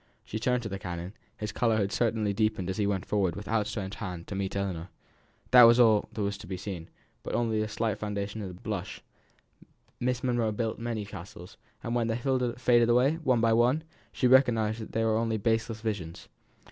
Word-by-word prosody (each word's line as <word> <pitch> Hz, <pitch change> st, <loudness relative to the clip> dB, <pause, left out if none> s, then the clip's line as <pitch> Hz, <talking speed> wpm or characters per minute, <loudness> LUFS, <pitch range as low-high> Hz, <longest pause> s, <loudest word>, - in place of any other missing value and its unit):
She 110 Hz, -, -4 dB
turned 125 Hz, +1 st, +1 dB
to 110 Hz, -, -4 dB
the 100 Hz, 0 st, -5 dB
canon; 90 Hz, +1 st, -6 dB, 0.2 s
his 105 Hz, -1 st, -4 dB
colour 115 Hz, -2 st, +1 dB
had 100 Hz, -2 st, 0 dB
certainly 110 Hz, -3 st, 0 dB
deepened 110 Hz, -3 st, 0 dB
as 95 Hz, -, -5 dB
he 105 Hz, -2 st, +1 dB
went 95 Hz, -2 st, -1 dB
forwards 95 Hz, -4 st, 0 dB
with 105 Hz, -, -7 dB
out 110 Hz, -2 st, +1 dB
stretched 95 Hz, -2 st, -5 dB
hand 90 Hz, -5 st, -5 dB
to -, -, -7 dB
meet 95 Hz, 0 st, -3 dB
Ellinor. 90 Hz, -3 st, -3 dB, 0.6 s
That 125 Hz, -, +9 dB
was 115 Hz, +1 st, +6 dB
all 110 Hz, -4 st, +5 dB
that 110 Hz, -, -5 dB
was 100 Hz, 0 st, -2 dB
to 105 Hz, -, -10 dB
be 95 Hz, -, -4 dB
seen; 90 Hz, -3 st, -6 dB, 0.3 s
but -, -, -4 dB
on 120 Hz, -1 st, +1 dB
the 110 Hz, 0 st, 0 dB
slight 105 Hz, -1 st, -2 dB
foundation 105 Hz, 0 st, -3 dB
of 100 Hz, -, -4 dB
that 90 Hz, -1 st, -11 dB
blush, -, -, -5 dB, 1.0 s
Miss 125 Hz, 0 st, -1 dB
Monro 120 Hz, -3 st, +1 dB
built 110 Hz, +1 st, -2 dB
many 115 Hz, -3 st, -3 dB
castles; 90 Hz, -2 st, -10 dB, 0.3 s
and 115 Hz, -, -3 dB
when 120 Hz, -1 st, +1 dB
they 115 Hz, 0 st, 0 dB, 0.4 s
faded 120 Hz, -1 st, +4 dB
away, 130 Hz, +6 st, +4 dB
one 125 Hz, -5 st, +3 dB
after 115 Hz, 0 st, +4 dB
one, 125 Hz, +7 st, +3 dB, 0.3 s
she -, -, -1 dB
recognised 120 Hz, -4 st, +4 dB
that 110 Hz, -, -9 dB
they 115 Hz, -, +1 dB
were 110 Hz, -1 st, +2 dB
only 115 Hz, -1 st, 0 dB
baseless 110 Hz, +1 st, -1 dB
visions. 100 Hz, -7 st, -4 dB
110 Hz, 210 wpm, -29 LUFS, 100-115 Hz, 1.0 s, That